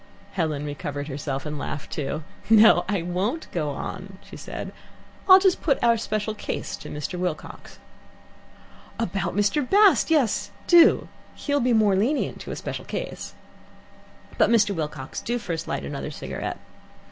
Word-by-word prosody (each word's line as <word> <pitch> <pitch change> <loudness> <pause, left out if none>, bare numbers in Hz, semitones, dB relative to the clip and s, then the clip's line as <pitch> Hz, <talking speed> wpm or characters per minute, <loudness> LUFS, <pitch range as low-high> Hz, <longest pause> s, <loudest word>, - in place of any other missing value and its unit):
Helen 155 -5 -2
recovered 145 0 -5
herself 140 0 -4
and 150 -1 -4
laughed 145 0 -5
too. 150 +1 -3 0.3
"No, 215 -5 +7
I 200 -5 0
won't 195 - -2
go 155 -4 -1
on," 190 +6 -6
she - - -12
declared. - - -7 0.6
"I'll 375 - +11
just 380 -1 +2
put 280 -5 +2
our 235 -1 +5
special 215 -1 -2
case 215 - -4
to - - -10
Mr. 150 +5 -5
Wilcox." 180 -4 -5 1.2
"About 190 -5 -2
Mr. 205 +8 +2
Bast? 390 +8 +4
Yes, 290 -9 +2 0.2
do. 345 -1 +6 0.3
He'll 285 -1 -1
be 250 -1 +1
more 215 -3 +4
lenient 245 +10 0
to - - -9
a - - -4
special - - -6
case. - - -6 1.0
"But, - - +5
Mr. 215 -3 +4
Wilcox, 150 -5 -5
do 240 +1 -1
first 170 -8 -4
light 70 - -3
another 70 - -5
cigarette. - - -5
195 Hz, 150 wpm, -24 LUFS, 155-235 Hz, 1.2 s, I'll